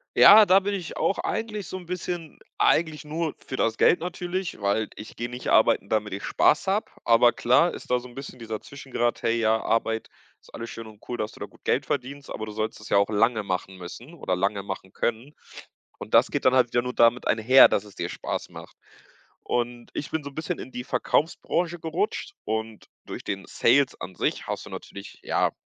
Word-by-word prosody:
Ja, 210 0 +9
da 190 +2 +7
bin 200 +1 -2
ich 180 -5 -5
auch 195 - +1
eigentlich 215 -4 -3
so 185 - -5
'n 180 - -10
bisschen 175 -2 -5 0.2
eigentlich 155 -3 +2
nur 160 +1 -3
für 130 - -5
das 115 0 +1
Geld - - +5
natürlich, 180 - -4
weil 100 +2 0
ich 105 - -10
gehe 120 0 -4
nicht 125 +1 -5
arbeiten, 100 - +4
damit 105 -1 -1
ich 100 - -5
Spaß 150 - +3
habe. 200 +3 0 0.2
Aber 120 +1 +6
klar 125 +8 +3
ist - - -9
da 125 - +3
so 125 - -11
'n 120 - -16
bisschen 135 -2 -8
dieser 110 -2 -5
Zwischengrad: 130 -4 -3
„Hey, 115 +1 +1
ja, 110 0 +2
Arbeit 115 0 0 0.3
ist - - -20
alles 115 0 -6
schön 115 -1 -8
und 105 -1 -14
cool, 120 - -3
dass 110 - -3
du - - -16
da - - -4
gut - - -22
Geld - - +1
verdienst, 140 +1 -4
aber 110 - -5
du 105 - -6
sollst 110 0 -3
es 105 - -10
ja - - +4
auch 100 +1 +3
lange 110 +1 +2
machen 95 0 -3
müssen 120 - -10
oder 95 - -2
lange 100 +1 -1
machen 95 -1 -7
können.“ 120 +6 -2 0.6
Und - - -9
das - - +5
geht - - -1
dann 130 0 +5
halt 125 -2 +4
wieder 120 - +3
nur 125 0 -4
damit 120 +1 +4
einher, 120 +4 +7
dass 100 - 0
es 105 -2 -15
dir 85 +1 -3
Spaß - - -4
macht. - - -12 0.7
Und 120 0 -2
ich 140 - -4
bin 160 -2 -2
so 140 - -6
'n - - -20
bisschen 160 +2 -3
in 130 - -9
die 125 0 -5
Verkaufsbranche 170 +4 0
gerutscht 400 - -2
und 110 -1 -4 0.2
durch - - -7
den 95 -1 -4
Sales 135 +3 +3
an 90 - -7
sich - - -1
hast - - -4
du - - -10
natürlich, 100 0 -9
ja, - - +1
120 Hz, 220 wpm, -25 LUFS, 110-160 Hz, 0.7 s, Ja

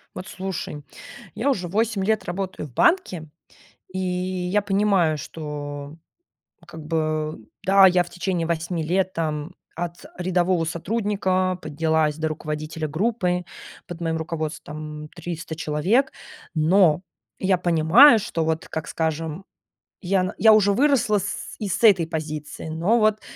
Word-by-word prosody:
Вот 185 +2 -7
слушай, 185 -7 -5 0.5
я 275 +5 0
уже 185 -9 -1
8 215 +1 0
лет 220 +2 +1
работаю 185 -3 -4
в 125 - -19
банке 180 - +2 0.6
и 185 - -4
я 185 +1 -1
понимаю, 195 -6 +2
что 145 -1 -7 0.7
как 160 -1 -10
бы, 155 -1 -1 0.3
да, 195 0 +7
я 180 -1 +3
в 175 - -13
течение 180 -1 -2
8 170 0 -2
лет 185 +3 0
там 155 0 -3 0.2
от 175 0 -5
рядового 180 -1 +1
сотрудника 185 0 0
поднялась 155 0 0
до 160 0 -1
руководителя 155 0 -4
группы, 180 +1 0 0.4
под 175 -1 -8
моим 165 -1 -1
руководством 155 -1 -5
300 165 -1 -6
человек, 175 - +1 0.4
но 165 0 +4 0.4
я 190 -1 +2
понимаю, 175 - +6
что 165 -5 -2
вот, 160 0 -1
как 160 -1 -5
скажем, 160 +2 -3 0.6
ян 185 -1 0
я 220 0 +7
уже 205 -2 +5
выросла 240 -3 +3
с - - -5
и 210 - -2
с 190 - -2
этой 190 -7 +6
позиции, 155 -2 -5
но 170 +9 +2
вот 215 -1 +2
175 Hz, 135 wpm, -23 LUFS, 155-195 Hz, 0.7 s, да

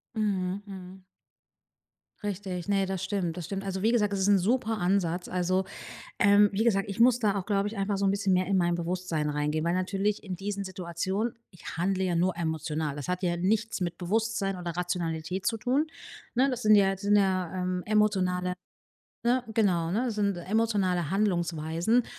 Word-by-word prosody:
Mhm, 195 -3 -1
mhm. 190 -1 -10 1.2
Richtig. 190 -3 -4
Ne, 195 -1 +2
das 190 -2 -3
stimmt. 180 -5 -1
Das 175 -3 -5
stimmt. 195 +2 -4
Also 190 -1 -3
wie 225 - +3
gesagt, 210 -4 +2
das 200 - -1
ist 200 - +3
'n 200 - +6
super 225 +2 +1
Ansatz. 180 -2 0
Also, 185 +1 0 0.5
ähm, 205 0 +6
wie 200 +3 0
gesagt, 195 -3 +2
ich 200 - -5
muss 245 +1 +5
da 210 -4 +1
auch, 185 - -6
glaube 200 0 +1
ich, 220 - -8
einfach 200 0 0
so 200 - 0
'n 195 - +4
bisschen 200 -1 +1
mehr 185 0 +2
in 195 -1 +2
mein 175 -1 +2
Bewusstsein 170 -3 -2
reingehen, 150 +1 -1
weil 170 +1 +1
natürlich 195 +3 0
in 185 -3 -4
diesen 200 +1 -4
Situationen 190 +4 -3 0.2
ich 180 - -9
handle 190 +2 0
ja 180 -2 0
nur 180 +2 +1
emotional. 160 -3 -2
Das 145 - -5
hat 180 +1 -2
ja 175 -1 +1
nichts 210 +4 0
mit 175 -1 -2
Bewusstsein 195 0 -1
oder 175 -1 -5
Rationalität 175 0 -2
zu 225 - +1
tun, 265 +7 +1 0.5
ne? 260 +3 +3
Das 250 -2 -3
sind 215 0 +7
ja 195 -1 +4
sind 205 +2 +2
ja, 185 -3 +2
ähm, 180 0 -2
emotionale, 185 -4 +1 0.7
ne 245 +1 +2
genau, 180 -7 +2
ne? 235 +5 0
Sind 205 -3 0
emotionale 185 -4 0
Handlungsweisen. 175 +2 +1
190 Hz, 185 wpm, -28 LUFS, 175-205 Hz, 1.2 s, sind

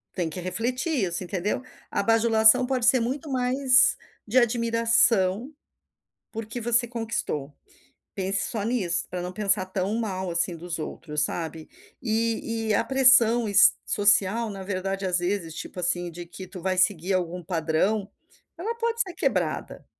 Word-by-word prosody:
Tem 175 -4 -2
que 160 - -7
refletir 240 - -3
isso, 175 +1 -4
entendeu. 190 +5 -3 0.3
A - - 0
bajulação 225 +2 +4
pode 255 -2 -1
ser 255 +1 +5
muito 270 +6 -4
mais 255 0 +3 0.3
de 230 +4 -1
admiração, 230 -1 +2 0.8
porque 225 +1 -6
você 240 +1 +3
conquistou. 225 - -4 0.6
Pense 195 0 -1
só 220 -4 -4
nisso, 195 -7 -1
pra 180 0 -5
não 180 +1 -6
pensar 195 -1 +1
tão 190 +1 -3
mal 190 -5 -3
assim 170 +1 0
dos 170 0 -6
outros, 150 -1 -3
sabe. 160 0 -5 0.3
E 225 -1 -2
e - - +2
a - - +2
pressão 240 -4 +5
es 200 +1 +6
social 205 +2 +3
na 195 -2 -7
verdade, 195 0 -3
às 180 -1 +1
vezes, 175 -2 -3
tipo 165 - -8
assim, 175 0 0
de 175 +1 -9
que 180 +2 -10
tu 180 - -10
vai 185 0 -1
seguir 185 0 +1
algum 180 -1 -2
padrão, 175 +5 -1 0.5
ela 415 +8 -3
pode 465 0 -1
ser 370 -5 -2
quebrada. - - -2
205 Hz, 155 wpm, -25 LUFS, 180-235 Hz, 0.8 s, es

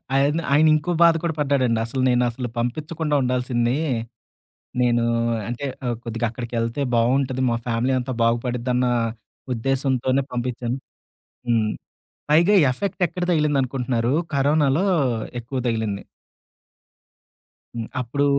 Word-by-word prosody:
ఆయన, 140 +4 +3
ఆయనింకో 155 +2 +4
బాధ 170 -1 +7
కూడా 165 -2 0
పడ్డాడండి. 135 -5 +2
అసలు 130 +3 -3
నేనసలు 125 0 +1
పంపించకుండా 150 +5 -2
ఉండాల్సింది. 125 -1 0 1.1
నేను 120 -1 +3 0.5
అంటే, 120 +4 -4 0.2
ఆహ్, 120 -1 -1
కొద్దిగా 115 0 -2
అక్కడికెళ్తే 115 +2 -3
బావుంటది. 130 +2 +2
మా 115 - +1
ఫ్యామిలీ 120 +2 0
అంతా 130 +1 -3
బాగుపడిద్దన్నా 125 +1 +1 0.6
ఉద్దేశంతోనే 130 +1 0
పంపిచ్చాను. 125 0 -2 0.7
హ్మ్. 110 -2 +2 0.6
పైగా 170 +7 +5 0.2
ఎఫెక్ట్ 190 +7 -3
ఎక్కడ 180 +2 -4
తగిలిందనుకుంటున్నారు? 130 -6 +1 0.2
కరోనాలో 145 +4 +2 0.6
ఎక్కువ 130 +3 -5
తగిలింది. 110 -3 -2 1.7
హ్మ్. 115 -1 -4
అప్పుడు 140 +4 0
125 Hz, 100 wpm, -23 LUFS, 120-140 Hz, 1.7 s, బాధ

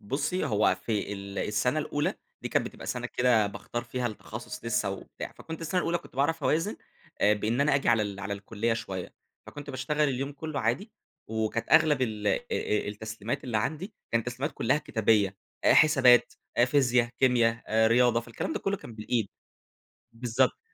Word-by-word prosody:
بُصي، 145 - -1
هو 105 -1 +3
في 105 -2 -3
ال 100 0 -6
السنة 115 +7 +1
الأولى 150 -1 -1 0.3
دي - - -3
كانت - - +1
بتبقى - - -9
سنة - - -2
كده 120 -4 +3
باختَار 120 +3 -5
فيها 125 +1 -2
التخصص 110 -3 -7
لسه - - 0
وبتاع، - - -7
فكنت 160 0 -8
السنة 175 +3 0
الأولى 175 0 0 0.2
باعرف 145 +4 +1
أوازِن 165 +7 +1 0.4
آآ، 105 - +5
بإن 110 +5 -1
أنا 145 0 +3
آجي 140 - +1
على 115 -2 +4
ال 100 -1 -4
على 100 +1 -4
الكلية 105 +3 -2
شوية. 95 -5 -5 0.3
فكنت 145 -1 -8
باشتغل 150 +3 0
اليوم 135 +2 -2
كله 150 0 -4
عادي، 180 - -1 0.4
وكانت 110 +1 -2
أغلب 155 -4 +5
ال 105 -4 -2
أ - - +4
أ 105 -1 -2
التسليمَات 110 +1 -5
اللي 120 -4 -1
عندي، 160 - -3 0.2
كان 115 - +3
التسليمات 125 +6 -3
كلها 140 +3 +2
كتابية: 105 -7 +1 0.3
حسابات، 130 -6 +6 0.3
فيزيا، 125 -3 +3
كيمياء، 120 -3 +3 0.2
رياضة، 120 0 +4
فالكلام 115 +6 -5
ده - - -2
كله 195 0 -1
كان 120 - -11
بالإيد. 110 0 -1 0.8
بالضبط، 120 +2 +1
120 Hz, 165 wpm, -28 LUFS, 110-145 Hz, 0.8 s, حسابات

